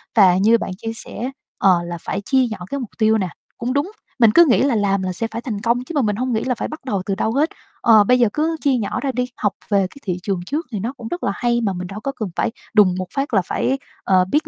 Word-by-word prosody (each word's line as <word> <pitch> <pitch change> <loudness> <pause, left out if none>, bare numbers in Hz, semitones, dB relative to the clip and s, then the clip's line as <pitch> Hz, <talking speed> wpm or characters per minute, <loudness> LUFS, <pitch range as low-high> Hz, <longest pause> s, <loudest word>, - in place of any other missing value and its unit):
Và 185 -5 +6
như 220 +4 +5
bạn 210 - -4
chia 225 +2 -5
sẻ, 240 +3 -5 0.3
ờ, 185 -3 +4
là 170 0 -5
phải 195 - -3
chia 260 +5 +2
nhỏ 220 - -5
cái 280 - -2
mục 245 -5 -5
tiêu 220 0 +4
nè, 190 -4 -1 0.3
cũng 245 +2 -2
đúng, 290 +8 0 0.3
mình 230 -3 +6
cứ 340 +8 +7
nghĩ 255 - +4
là 275 -3 +2
làm 200 -2 +1
là 185 0 -2
sẽ 225 +5 -2
phải 230 - -4
thành 215 -5 -4
công 235 +2 +1
chứ 295 - -8
mà 285 - +3
mình 210 -4 +1
hông 250 +2 -1
nghĩ 220 - 0
là 255 -2 0
phải - - -3
bắt 310 -3 -9
đầu 200 -7 -1
từ 195 - -1
đâu 220 - 0
hết. 300 +4 +2 0.3
Ờ, 220 -3 +7
bây 250 +4 +3
giờ 240 - +5
cứ 320 +2 0
chia 280 -3 +3
nhỏ 220 -5 -2
ra 275 - -1
đi, 250 -1 -1
học 205 -2 0 0.2
về 200 - +4
cái - - -17
thị 180 -2 -2
trường 195 -3 -1
trước 295 - -2
thì 210 - -3
nó 230 +7 -3
cũng 230 - -7
rất 350 +8 -5
là - - +1
hay 240 -1 +1
mà 205 -4 0
mình 180 0 -5
đâu 195 +3 -7
có 275 - -3
cần 215 -4 -3
phải 230 - 0 0.2
đùng 200 -5 +5
một 185 -1 -3
phát 275 -3 -2
là 195 - +4
phải, 265 - 0 0.3
ờ, 185 -1 +4
biết 300 +2 +1
225 Hz, 295 wpm, -20 LUFS, 200-255 Hz, 0.3 s, cứ